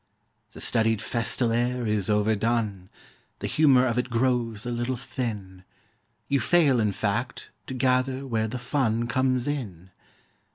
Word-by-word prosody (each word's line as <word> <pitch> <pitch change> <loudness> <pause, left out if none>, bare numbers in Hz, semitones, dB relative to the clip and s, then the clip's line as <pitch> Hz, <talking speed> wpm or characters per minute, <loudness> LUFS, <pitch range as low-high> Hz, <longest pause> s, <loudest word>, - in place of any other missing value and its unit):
The - - -10
studied 115 -2 +2
festal 115 +2 0
air 120 +1 0
is 105 -3 0
overdone; 105 -2 0 0.5
The - - -6
humour 135 -5 +4
of 120 -1 0
it 125 - -2
grows 120 -3 0
a 120 - -3
little 120 +2 -2
thin; 115 -8 -6 0.6
You 140 - +1
fail, 140 0 +3
in 105 -2 +2
fact, 115 +5 -3 0.2
to 130 - -5
gather 130 +1 +1
where 110 -4 -1
the 115 - -4
fun 120 -3 0
Comes 130 +1 0
in. 95 - -5
120 Hz, 140 wpm, -26 LUFS, 110-130 Hz, 0.6 s, humour